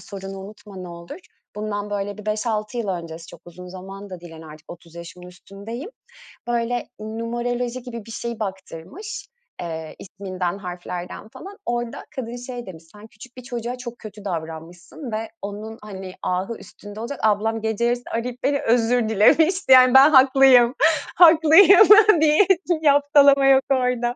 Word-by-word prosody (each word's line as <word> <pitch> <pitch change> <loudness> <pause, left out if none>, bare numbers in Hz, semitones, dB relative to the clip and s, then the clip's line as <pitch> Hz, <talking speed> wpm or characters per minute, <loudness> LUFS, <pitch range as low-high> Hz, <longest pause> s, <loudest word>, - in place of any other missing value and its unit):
sorunu 195 -1 -9
unutma 195 -2 -11
olur. 170 - -10 0.4
Bundan, 210 -1 -4
böyle, 205 0 -4
bir 210 - -11
5-6 215 +1 -3
yıl 220 - -3
öncesi 165 -3 -6
çok 165 - -14
uzun 180 +1 -12
zaman 195 +2 -10
da 180 -2 -9
değil, 170 -1 -12
hani, 160 0 -12
artık 155 +1 -14
30 170 -1 -17
yaşımın 170 +1 -11
üstündeyim. 200 - -10 0.6
Böyle, 240 0 -2
numeroloji 240 +3 -4
gibi 235 -4 -9
bir 225 - -11
şeyi 235 0 -6
baktırmış. 195 - -8 0.3
Eee, 160 -2 -7
isminden, 185 -1 -5
harflerden 180 +1 -8
falan. 390 - -12
Orada 240 -1 -4
kadın 240 -2 -6
şey 245 0 -8
demiş, 170 -4 -11
"Sen 210 +1 -13
küçük 245 +4 -16
bir 250 - -10
çoçuğa 245 -1 -5 0.2
kötü 210 -1 -12
davranmışsın 170 - -7
ve 220 +1 -4
onun, 210 +2 -7
hani, 190 -3 -9
ahı 190 +5 -3
üstünde 205 +1 -13
olacak." 255 +5 -6
Ablam 220 +1 0
gece 220 +1 -2
yarısı 245 0 -1
arayıp 245 +2 -5
beni 280 0 0
özür 230 0 +1
dilemişti. 315 - +3
Yani 255 0 +7
ben 270 +3 +8
haklıyım. 265 -3 +5 0.4
Haklıyım 345 +4 +7 0.3
diye 310 +5 +4 0.2
bir 325 -3 0
yaftalama 285 -1 +4
yok 270 0 +5
orada. 250 -2 0
220 Hz, 150 wpm, -21 LUFS, 190-250 Hz, 0.6 s, ben